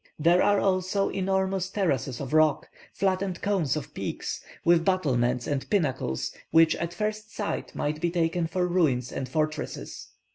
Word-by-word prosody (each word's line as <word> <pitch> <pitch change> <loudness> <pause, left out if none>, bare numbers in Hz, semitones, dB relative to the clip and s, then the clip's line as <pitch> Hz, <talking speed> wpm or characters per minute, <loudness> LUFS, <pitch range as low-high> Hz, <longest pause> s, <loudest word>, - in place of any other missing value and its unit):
There 170 +4 +4
are, 205 -1 +4
also, 190 +1 +1
enormous 190 -1 0
terraces 140 - -1
of 140 +1 -5
rock, 155 -2 +3 0.2
flattened 190 -1 -1
cones 185 -9 +1
of 155 - -5
peaks, - - -4 0.2
with 170 -1 +5
battlements 125 -10 +1
and 140 -2 -2
pinnacles, 130 - 0 0.2
which 165 0 +5
at 170 +1 -3
first 215 +2 -3
sight 205 - -3
might 150 +1 -2
be 175 - +1
taken 170 0 0
for 180 +2 0
ruins 150 -9 +1
and 130 - -4
fortresses. 155 +1 -3
170 Hz, 150 wpm, -27 LUFS, 150-190 Hz, 0.2 s, with